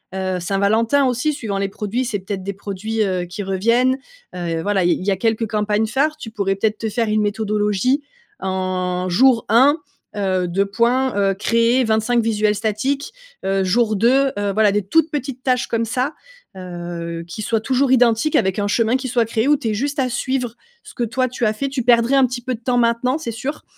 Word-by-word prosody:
heu, 185 -1 -1
Saint-Valentin 220 +9 +2
aussi 255 +5 0
suivant 220 -8 -4
les 195 0 0
produits 215 +6 -3
c'est 210 -4 -2
peut-être 190 0 -5
des 200 +1 -4
produits, 210 +3 -3
heu, 185 -2 -1
qui 180 +4 -6
reviennent, 230 +7 +2 0.4
heu, 175 -1 -4
et 165 -1 -2
voilà 195 -2 +1
il 175 - +3
il 185 - -6
y 200 - +2
a 190 - 0
quelques 225 0 0
campagnes 210 0 0
phares. 285 +6 0
Tu 225 -7 -9
pourrais 195 -3 -1
peut-être 215 +2 0
te 220 - -3
faire 225 +1 -1
une 215 0 +2
méthodologie? 210 +5 0 0.4
En 185 -1 -2
jour 235 +5 +4
1, 275 +7 +5 0.4
heu, 185 -3 0
2 195 +3 +1
points, 245 +5 +1
heu, 195 -1 +2
créer 230 +5 +2
25 220 +1 +1
visuels 215 -1 +1
statiques. 240 - -2 0.3
Heu, 195 0 +1
jour 220 +3 +2
2, 265 +5 +3
heu, 200 -1 -1
voilà 215 -1 +3
des 210 +1 +1
toutes 320 - +2
petites 270 -3 -4
tâches 250 -2 +1
comme 230 0 -1
ça, 255 +6 -1 0.4
heu, 175 -2 -6
qui 175 +5 -7
soient 225 0 0
toujours 260 +2 +1
identiques 245 +3 +3
avec 190 +1 +1
un 205 - 0
chemin 230 +3 +2
qui 260 0 -2
soit 240 -2 +1
créé 225 +3 -1
où 295 - +4
tu 240 -5 -3
aies 215 - 0
juste 285 +7 -2
à 265 - +1
suivre 250 -1 -2 0.3
ce - - -13
que 240 - -2
toi 255 +3 0
tu 240 -2 -1
as 215 - +1
fait, 275 +6 -3
tu 265 -2 -2
perdrais 235 +1 +3
un 270 -2 +5
petit 245 0 -5
peu 255 -1 -2
de 225 - -6
temps 245 +1 0
maintenant 240 +3 +1
c'est 290 -8 -5
sûr, 260 +7 -5
220 Hz, 215 wpm, -20 LUFS, 195-250 Hz, 0.4 s, 1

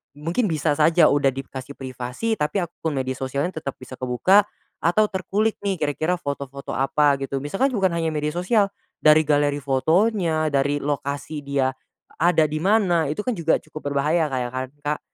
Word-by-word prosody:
mungkin 165 +10 -1
bisa 155 -3 0
saja 155 +2 +4
udah 140 -1 +3
dikasih 135 0 -7
privasi 130 - -4
tapi 155 +6 0
akun 165 -2 -4
media 130 -1 -1
sosialnya 140 +6 -3
tetap 140 -4 -5
bisa 130 0 -11
kebuka, 185 +12 +3 0.3
atau 210 +6 +2
terkulik 205 +3 -1
nih 200 -1 -1
kira-kira 155 +2 -1
foto-foto 140 -4 -6
apa 140 +2 +2
gitu. 135 0 -3
Misalkan 195 - +1
bukan 190 -3 +2
hanya 165 -1 -1
media 150 0 -1
sosial, 195 +4 +1 0.3
dari 155 0 +6
galeri 145 -1 +2
fotonya, 160 - +1
dari 145 0 +1
lokasi 145 +1 -3
dia 135 -2 0 0.4
ada 165 -1 +3
di 155 +1 -4
mana, 190 -5 +3
itu 155 - -5
kan 230 +2 -1
juga 165 -2 +1
cukup 155 -2 -7
berbahaya 150 +2 +1
kayak 125 -2 -1
kan 130 0 -2
Kak. 150 +1 -2
150 Hz, 165 wpm, -23 LUFS, 140-175 Hz, 0.4 s, dari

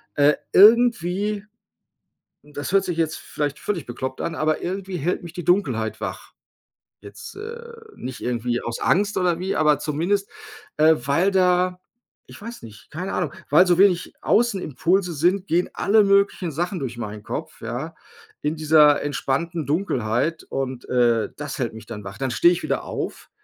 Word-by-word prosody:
äh, 145 +1 +5 0.2
irgendwie 210 -2 +4 1.0
das 145 -2 -6
hört 195 -1 +4
sich 175 -2 -3
jetzt 160 -1 0
vielleicht 145 -1 -4
völlig 180 -8 -3
bekloppt 130 +2 -5
an, 170 - -3
aber 155 0 0
irgendwie 190 0 -4
hält 175 +6 -1
mich 170 - -8
die 175 - -6
Dunkelheit 130 - +1
wach. - - -6 0.7
Jetzt, 100 - -11
äh, 465 +3 -8 0.3
nicht 130 0 -7
irgendwie 120 0 -1
aus 115 0 -4
Angst 205 +3 +2
oder 175 -2 +1
wie, 190 +1 -2
aber 150 -2 +3
zumindest, 170 +7 -1 0.5
äh, 155 +1 +6
weil 140 +10 +1
da 180 -1 +2 0.5
ich - - -14
weiß 235 +2 -8
nicht, 110 -2 -13
keine 180 +5 -5
Ahnung, 175 -5 -1 0.2
weil 175 +5 +6
so 175 0 +3
wenig 185 -3 +3
Außen-Impulse 190 - +1
sind, 180 +6 +1
gehen 175 +2 +1
alle 215 +1 +4
möglichen 200 -3 +2
Sachen 175 +3 -2
durch 120 -3 -5
meinen 105 -2 -6
Kopf, 155 +7 -6
ja? 125 +8 -5 0.5
In 150 +2 -1
dieser 150 -1 +5
entspannten 145 +4 -2
Dunkelheit 145 - -1
und, 130 -2 -4
äh, 120 -3 +2
das 150 -1 -6
hält 120 -3 -1
mich 110 -2 -11
dann 105 -3 -7
wach. 100 0 -8
Dann 135 -2 -2
stehe 170 +8 +5
ich 175 - -3
wieder - - -1
auf - - -6
160 Hz, 165 wpm, -23 LUFS, 130-185 Hz, 1.0 s, äh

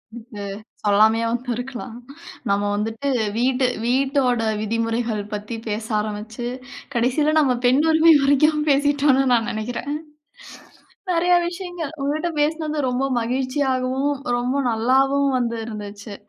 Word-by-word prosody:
இதுக்கு 225 -3 -9 0.4
சொல்லாமயே 220 +2 +4
வந்திருக்கலாம். 245 0 -4 0.5
நம்ம 200 +1 +2
வந்துட்டு 225 +7 -2 0.3
வீட்டு 255 +1 +2 0.2
வீட்டோட 260 -1 +2 0.2
விதிமுறைகள் 230 0 -1
பத்தி 210 +3 -4
பேச 215 +1 -3
ஆரம்பிச்சு, 215 +3 -5 0.5
கடைசில 260 +6 +1
நம்ம 275 -4 +3
பெண் 260 +4 +4
உரிமை 320 +1 +6
வரைக்கும் 300 +2 +3
பேசிட்டோம்ன்னு 280 -1 +3
நான் 230 -1 +2
நெனைக்கிறேன். 235 +6 -4 1.2
நெறைய 355 +1 +3
விஷயங்கள் 350 -3 -6
உங்கட்ட 310 +5 -1
பேசினது 310 0 -1
ரொம்ப 250 +2 -1 0.2
மகிழ்ச்சியாகவும், 260 +2 0 0.2
ரொம்ப 250 +3 -1
நல்லாவும் 270 +5 +2
வந்து 235 -2 -1
இருந்துச்சு. 205 -1 -8
255 Hz, 105 wpm, -22 LUFS, 225-285 Hz, 1.2 s, உரிமை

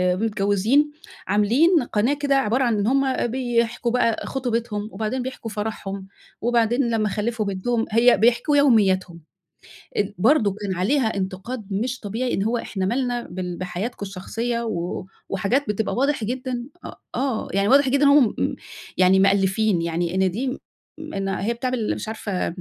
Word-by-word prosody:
متجوّزين 215 +7 +1 0.4
عاملين 250 - +3
قناة 235 +4 +1
كده 285 -1 0
عبارة 260 0 +2
عن 235 -3 +1
إن 205 - 0
هُم 265 -2 +1
بيحكوا 240 -1 0
بقى 230 -3 +1
خطوبتهم 230 -5 -2
وبعدين 220 +5 -2
بيحكوا 245 -3 -6
فرحهم 200 -2 -5 0.3
وبعدين 240 +2 +2
لما 215 -2 +1
خلّفوا 215 +1 -2
بنتهم، 225 +4 -1
هي 235 +2 +5
بيحكوا 240 +7 +3
يومياتهم 190 - +3 0.8
ال 205 0 0
برضه 215 -2 +3
كان 195 -2 -2
عليها 220 +4 +1
إنتقاد 195 +4 -4
مش 245 +5 -2
طبيعي 230 +5 -3
إن 195 - 0
هو 235 +2 0
إحنا 190 -4 -3
مالنا 245 +2 -1
بال 180 -1 -5
بحياتكم 190 +4 -4
الشخصية 230 +5 -3
و 180 -4 -3 0.2
وحاجات 220 +9 0
بتبقى 210 +1 -1
واضح 275 -2 +1
جدًا، 250 +1 -3 0.2
أ - - -5 0.3
آه 260 -5 -1
يعني 200 +1 +2
واضح 275 0 +5
جدًا 280 +2 +2
إن 285 - +6
هُم 280 -6 +5
مم - - -1 0.4
يعني 185 +1 +5
مألّفين 195 0 +2
يعني 170 +1 -2
إن 190 -1 +2
دي، 255 +6 -3 0.4
إن 200 -12 -4
هي 195 +4 -1
بتعمل 245 -2 -2
مش - - -6
عارفة 210 -4 -3
225 Hz, 155 wpm, -23 LUFS, 195-250 Hz, 0.8 s, إن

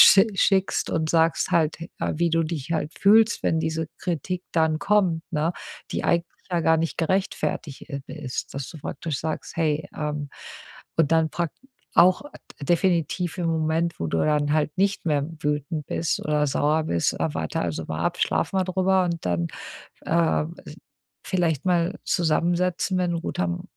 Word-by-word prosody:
sch 195 - +9
schickst 190 0 +2
und 160 -1 0
sagst 165 -1 +2
halt, 160 -2 +3 0.2
äh, - - -1
wie 170 +1 +2
du 165 0 +2
dich 155 -2 -5
halt 155 -1 -1
fühlst, 220 +3 +5
wenn 160 - +2
diese 160 0 -2
Kritik 180 +1 -3
dann 160 -1 +2
kommt, 190 -6 +2
ne, 155 +2 +1 0.4
die - - -2
eigentlich 170 0 +2 0.2
ja 175 -1 +1
gar 160 0 +4
nicht 165 0 -2
gerechtfertigt 170 -4 -1
i 140 -1 -4
ist. 145 -5 -5
Dass 135 -1 -4
du 160 - -10
praktisch 145 0 -4
sagst: 160 0 -4
„Hey“, 155 -2 0
ähm, 150 -1 -3 0.7
und 160 -2 +3
dann 160 -1 +3
prak 170 -2 -2 0.4
auch, 180 +2 +6
äh, 225 - -12
definitiv 175 +1 +1
im 175 - 0
Moment, 160 +1 0
wo 80 - 0
du 80 - 0
dann 150 -1 +2
halt 150 -1 0
nicht 200 +1 +1
mehr 145 -3 +2 0.2
wütend 150 +1 -2
bist 165 - -1
oder 150 -1 +1
sauer 150 +3 +1
bist, 85 - +1
äh, 80 -2 -2
warte 80 -1 -2
also 80 -2 -2
mal 80 +1 -3
ab, - - 0
schlaf - - +1
mal 190 -1 +2
drüber 185 0 +2
und 170 -2 -3
dann, 85 -1 0 0.6
ähm, 165 -1 +1
als 150 - -9 0.5
vielleicht 165 -6 0
mal 175 0 +2
zusammensetzen, 175 +2 +1
wenn 180 -1 +1
'n 170 - -2
guter 180 - -1
M 175 -1 -2
160 Hz, 175 wpm, -25 LUFS, 150-175 Hz, 0.7 s, sch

